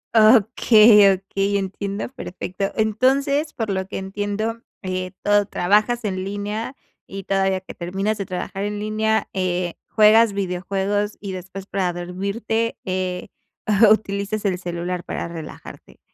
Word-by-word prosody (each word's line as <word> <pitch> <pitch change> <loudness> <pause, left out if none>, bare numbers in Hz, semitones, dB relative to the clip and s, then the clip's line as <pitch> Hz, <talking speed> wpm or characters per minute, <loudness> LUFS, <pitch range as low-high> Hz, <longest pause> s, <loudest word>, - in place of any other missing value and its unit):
Okey, 215 -2 +7
okey, 195 +1 -1
entiendo 200 +1 -3
perfecto. 195 -5 -5
Entonces, 270 +7 +1
por 225 -7 -3
lo 190 -1 -2
que - - -5
entiendo, 205 +4 -3 0.2
eh, 185 -1 -3
todo 205 -1 +3
trabajas 215 +7 +2
en 185 -2 -2
línea, 205 +5 -4 0.3
y 195 0 -7
todavía 195 -1 +1
que - - -10
terminas 195 +5 -2
de 200 - -3
trabajar 190 +2 -4
en 205 0 -3
línea, 215 +1 0
eh, 180 -2 -1
juegas 220 0 +5
videojuegos 195 +2 -2
y 200 -2 -6
después 185 +1 -7
para 190 -3 -1
dormirte, 200 +6 -2
eh, 185 -1 -3 0.6
utilizas 205 0 0
el 185 -3 0
celular 175 0 -4
para - - -4
relajarte. 165 -2 -10
200 Hz, 130 wpm, -22 LUFS, 185-215 Hz, 0.6 s, Okey